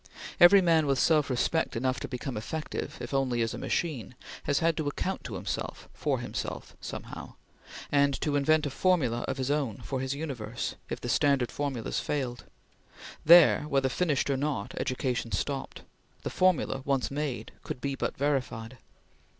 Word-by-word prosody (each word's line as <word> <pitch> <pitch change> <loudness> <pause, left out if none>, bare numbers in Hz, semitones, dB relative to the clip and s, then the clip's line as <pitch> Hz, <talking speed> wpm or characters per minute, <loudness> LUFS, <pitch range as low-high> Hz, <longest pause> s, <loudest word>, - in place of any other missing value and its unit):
Every 190 +2 +8
man 165 -3 +4
with 135 -1 +2
self 155 -1 +3
respect 145 +6 0
enough 130 +2 0
to - - -5
become 125 0 -4
effective, 150 +9 -4
if - - -6
only 130 -4 +1
as 115 - -2
a - - -5
machine, 140 -8 -2 0.3
has 145 - +2
had 165 0 +2
to 155 -3 -1
account 185 +6 -2
to 110 - -5
himself 90 - -4
for - - 0
himself - - -5
somehow, - - -7 0.6
and 140 -1 +3
to 150 -2 0
invent 155 +2 +3
a 145 - -2
formula 140 -8 +2
of - - -2
his 130 +1 -1
own 140 -8 0
for 130 +5 -3
his 130 +1 -2
universe, 125 -7 -4 0.2
if - - -3
the - - -6
standard 135 -5 +2
formulas 135 -6 -2
failed. 125 -5 -3 0.8
There, 170 0 +8
whether 135 -2 +2
finished 145 -1 +1
or 135 - +1
not, 140 -7 -2
education 125 -2 -2
stopped. 140 -2 -3 0.4
The - - -3
formula, 185 -7 +2
once 135 -2 0
made, 145 -2 -3
could - - -6
be 140 +1 -2
but - - -3
verified. 130 -4 -1
140 Hz, 165 wpm, -29 LUFS, 125-150 Hz, 0.8 s, Every